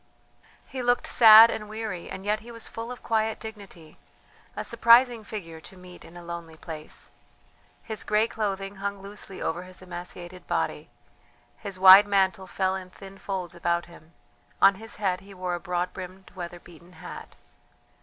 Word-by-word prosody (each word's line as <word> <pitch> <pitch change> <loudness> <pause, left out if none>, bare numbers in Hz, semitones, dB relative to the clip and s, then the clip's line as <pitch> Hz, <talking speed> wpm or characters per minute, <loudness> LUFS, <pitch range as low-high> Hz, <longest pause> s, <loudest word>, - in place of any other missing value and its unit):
He 260 - -6
looked 245 0 +1
sad 225 0 +9
and 210 -1 -6
weary, 215 -5 -5
and 190 - -8
yet 210 +1 +1
he 225 +2 -14
was 230 -1 -4
full 230 +2 -7
of 250 - -9
quiet 220 -1 0
dignity; 200 -8 -11 0.6
a - - -4
surprising 235 0 +4
figure 165 -7 -8
to 190 - -13
meet 180 -1 -13
in 165 +1 -14
a 175 - -10
lonely 170 -2 -8
place. 155 -1 -8 0.7
His 220 -2 -5
grey 215 +1 +2
clothing 200 -3 -4
hung 200 0 -4
loosely 200 -1 -7
over 170 +2 -2
his 185 0 -9
emaciated 180 0 -9
body, - - -2 0.7
his 200 -3 -7
wide 190 +2 +9
mantle 190 -2 +1
fell 190 0 -1
in 185 -1 -7
thin 195 +1 -13
folds 185 -3 -5
about 170 0 -1
him; 170 -1 -17 0.5
on 195 - +7
his 225 - -4
head 190 -3 -1
he 195 0 -14
wore 180 -1 -3
a 175 - -2
broad 180 0 -3
brimmed, 185 0 -10
weather 175 -1 -7
beaten 175 +1 -17
hat. 160 - -10
190 Hz, 170 wpm, -26 LUFS, 175-215 Hz, 0.7 s, sad